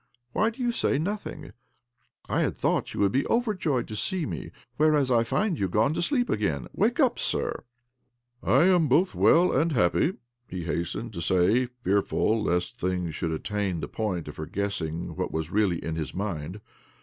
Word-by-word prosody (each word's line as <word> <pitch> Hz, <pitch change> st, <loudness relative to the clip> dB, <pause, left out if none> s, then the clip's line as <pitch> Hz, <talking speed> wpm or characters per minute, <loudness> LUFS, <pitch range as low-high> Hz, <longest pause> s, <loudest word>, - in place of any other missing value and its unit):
' 120 Hz, 0 st, -51 dB
Why 220 Hz, -, +2 dB
do 235 Hz, +3 st, -6 dB
you 240 Hz, -, +2 dB
say 185 Hz, -, +1 dB
nothing? 160 Hz, -3 st, -4 dB, 0.8 s
I -, -, +1 dB
had -, -, -1 dB
thought -, -, 0 dB
you -, -, -4 dB
would 100 Hz, -1 st, +3 dB
be 135 Hz, -, +2 dB
over 230 Hz, -2 st, +1 dB
joyed 145 Hz, -, -1 dB
to 110 Hz, -, -5 dB
see 180 Hz, -, -1 dB
me, -, -, -5 dB, 0.3 s
whereas 150 Hz, -3 st, +3 dB
I 115 Hz, -1 st, +4 dB
find 195 Hz, -, 0 dB
you 95 Hz, -, 0 dB
gone 110 Hz, -, +2 dB
to -, -, -1 dB
sleep 245 Hz, +6 st, +1 dB
again! 100 Hz, -, -1 dB
Wake -, -, +1 dB
up, -, -, +3 dB
sir! -, -, -2 dB, 0.3 s
" 125 Hz, 0 st, -49 dB
" 120 Hz, 0 st, -46 dB
I 135 Hz, +5 st, +4 dB
am 175 Hz, -3 st, +4 dB
both 175 Hz, +8 st, +3 dB
well 175 Hz, +2 st, +5 dB
and 155 Hz, +4 st, +2 dB
happy," 115 Hz, -, +2 dB, 0.3 s
he 90 Hz, -1 st, -5 dB
hastened 85 Hz, +7 st, -3 dB
to 85 Hz, -, -5 dB
say 95 Hz, +9 st, +3 dB
— 125 Hz, -, -44 dB
fearful 100 Hz, +2 st, +1 dB
lest 90 Hz, -3 st, -1 dB
things 90 Hz, -2 st, -1 dB
should 80 Hz, +1 st, -2 dB
attain 95 Hz, +2 st, -2 dB
the 70 Hz, -, -4 dB
point 95 Hz, -6 st, -3 dB
of 75 Hz, -, -8 dB
her 80 Hz, -, -5 dB
guessing 85 Hz, -4 st, -3 dB
what -, -, -3 dB
was 80 Hz, 0 st, -3 dB
really 100 Hz, -5 st, +2 dB
in 80 Hz, -1 st, -2 dB
his 80 Hz, -, -4 dB
mind. 90 Hz, -1 st, -4 dB
110 Hz, 200 wpm, -27 LUFS, -, 0.8 s, well